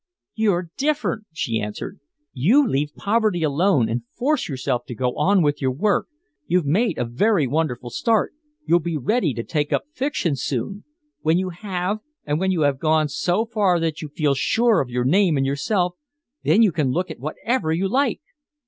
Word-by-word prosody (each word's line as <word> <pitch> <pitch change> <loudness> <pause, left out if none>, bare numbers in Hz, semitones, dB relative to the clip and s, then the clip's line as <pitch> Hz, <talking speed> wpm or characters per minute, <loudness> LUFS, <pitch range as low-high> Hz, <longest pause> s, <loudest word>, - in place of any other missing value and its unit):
"You're 185 -6 0
different," 285 -6 -1
she 115 -8 -2
answered. 105 0 -6 0.3
"You 230 - +4
leave 145 -3 -1
poverty 210 -5 +1
alone 150 - +2
and 115 +2 -2 0.2
force 290 - 0
yourself 130 -2 -2
to 120 - -7
go 125 +2 -1
on 195 -2 +3
with 145 0 0
your 130 - +2
work. 200 +11 +1 0.4
You've 180 -3 +2
made 200 +12 +1
a 125 - 0
very 160 - +2
wonderful 125 -4 -2
start. 225 - +1 0.3
You'll 170 - +4
be 170 -1 -3
ready 170 - +1
to 115 - -3
take 150 +1 -2
up - - +1
fiction 260 - -1
soon. 135 - -3 0.4
When 160 +2 +2
you 185 0 -1
have, 185 +2 -3 0.3
and 150 +1 0
when 190 +1 +1
you 180 -4 +1
have 140 -2 +2
gone 155 -1 +2
so 175 +9 0
far 205 -6 +2
that 165 -2 -2
you 155 - -6
can 145 - -37
feel 150 -3 +2
sure 225 - +2
of 130 - -4
your 125 0 -1
name 175 +2 +3
and 135 - +1
yourself, 175 +7 0 0.5
then 225 - +5
you 210 - +4
can 150 -4 0
look 180 +8 -1
at - - -9
whatever 160 - -2
you 175 +4 +1
like." 265 +4 +1
165 Hz, 190 wpm, -22 LUFS, 140-205 Hz, 0.5 s, then